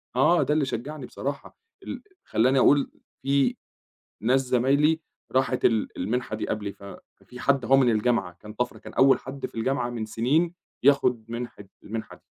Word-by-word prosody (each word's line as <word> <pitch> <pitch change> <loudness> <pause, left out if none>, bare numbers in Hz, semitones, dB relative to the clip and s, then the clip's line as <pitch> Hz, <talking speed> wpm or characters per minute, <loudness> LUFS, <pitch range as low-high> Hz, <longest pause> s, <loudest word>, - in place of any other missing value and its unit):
آه، 165 +7 +4
ده 150 - +1
اللي 150 -3 +2
شجّعني 135 +3 -5
بصراحة 140 +2 -6 0.3
ال - - -7 0.2
خلّاني 130 +4 +2
أقول 140 +2 +4 0.3
في 140 0 +2 0.7
ناس 130 +5 +3
زمايلي 135 +5 +2 0.3
راحت 130 -1 +1
ال 110 -2 +1
المنحة 110 +4 -2
دي 110 - -4
قبلي، 105 -2 -3
ف - - -18 0.4
في 125 - -12
حد 135 -2 +2
أهو 135 +2 +5
من 130 -3 +4
الجامعة 110 -5 +1
كان 105 0 -10
طَفرة، 125 +2 -2
كان - - -11
أول 135 0 +5
حد 135 +1 -6
في - - -9
الجامعة 120 +2 0
من 115 -2 -4
سنين 140 +11 +1 0.3
ياخد 125 -4 +3
منحة 120 -3 -6 0.2
المنحة 110 +1 -6
دي. - - -25
125 Hz, 170 wpm, -26 LUFS, 115-140 Hz, 0.7 s, أهو